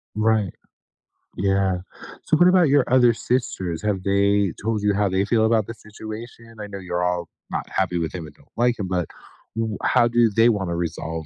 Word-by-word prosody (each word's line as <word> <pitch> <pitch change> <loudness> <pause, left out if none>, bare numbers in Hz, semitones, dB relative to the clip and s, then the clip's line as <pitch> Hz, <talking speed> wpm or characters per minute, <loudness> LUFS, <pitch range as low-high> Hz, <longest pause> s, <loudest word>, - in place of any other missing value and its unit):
Right. 110 -2 +1 0.9
Yeah. 95 -1 +1 0.5
So, - - +2
what 175 - +6
about 180 -2 +5
your 140 -1 +4
other 125 -2 +5
sisters? 95 -9 -2
Have 105 -3 -1
they 100 0 +2
told 110 0 -1
you 105 0 +3
how 100 0 +1
they 95 +1 +1
feel 110 +1 +2
about 110 -2 +2
the 115 - -5
situation? 110 +1 -10
I 105 - -6
know 100 -1 -7
you're 90 -1 -3
all 90 -2 -1 0.2
not - - -3
happy 90 -2 -1
with 80 -2 -2
him 90 -3 -6
and 75 - -13
don't - - -24
like 120 0 +2
him, 100 - -2
but 90 -2 -1 0.5
w 110 -2 -2
how 120 -2 +4
do 120 -1 +3
they 115 +1 +5
wanna 95 -6 -1
resolve 80 -1 -4
105 Hz, 195 wpm, -23 LUFS, 95-115 Hz, 0.9 s, what